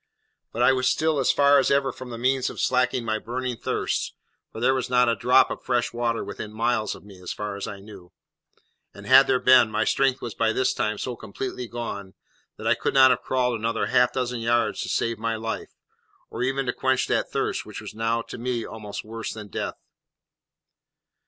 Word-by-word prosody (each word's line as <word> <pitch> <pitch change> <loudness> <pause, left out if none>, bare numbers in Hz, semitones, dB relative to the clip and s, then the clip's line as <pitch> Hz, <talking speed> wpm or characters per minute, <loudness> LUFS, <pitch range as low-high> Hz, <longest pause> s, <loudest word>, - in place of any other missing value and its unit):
But 120 - 0
I 130 +2 +6
was 130 -1 +1
still 160 -2 +1
as 135 - +3
far 140 0 +5
as 135 - +2
ever 140 -1 +2
from 130 -1 -10
the 115 - -6
means 130 +2 +1
of - - -9
slaking 125 -1 +1
my 110 -1 -1
burning 125 +2 -3
thirst, - - -2 0.4
for - - -8
there 130 +3 +3
was 130 -2 -2
not 125 0 +4
a 115 - +2
drop 125 +5 +4
of - - -5
fresh 125 -2 0
water 120 -1 -1
within 105 - -7
miles 110 0 0
of - - -14
me, 100 -2 -14
as 90 - -5
far 105 -1 -5
as 100 - -5
I 100 - -7
knew; 100 -4 -13 0.8
and 100 - -11
had 135 +3 +7
there 130 -1 +2
been, 125 -3 +6
my - - 0
strength 135 -1 +2
was 120 -4 -6
by 110 +1 +1
this 130 - +1
time 105 0 -1
so 125 +3 -4
completely 125 +3 -6
gone 100 -5 -6 0.4
that - - -9
I - - +4
could - - -2
not 130 -1 +8
have 125 - +1
crawled 125 -3 0
another 115 +1 -1
half 125 - +3
dozen 125 -2 -2
yards 120 +1 +1
to - - -4
save 115 -2 -1
my 115 0 -1
life, 115 0 -5 0.6
or - - -5
even 135 +2 0
to - - -1
quench 130 -1 +1
that - - 0
thirst - - -1
which - - -7
was - - -8
now 115 +1 -1
to - - -9
me 120 -1 -2
almost 105 -2 -7
worse 115 +1 -5
than 105 -2 -9
death. - - -4
120 Hz, 215 wpm, -25 LUFS, 110-130 Hz, 0.8 s, not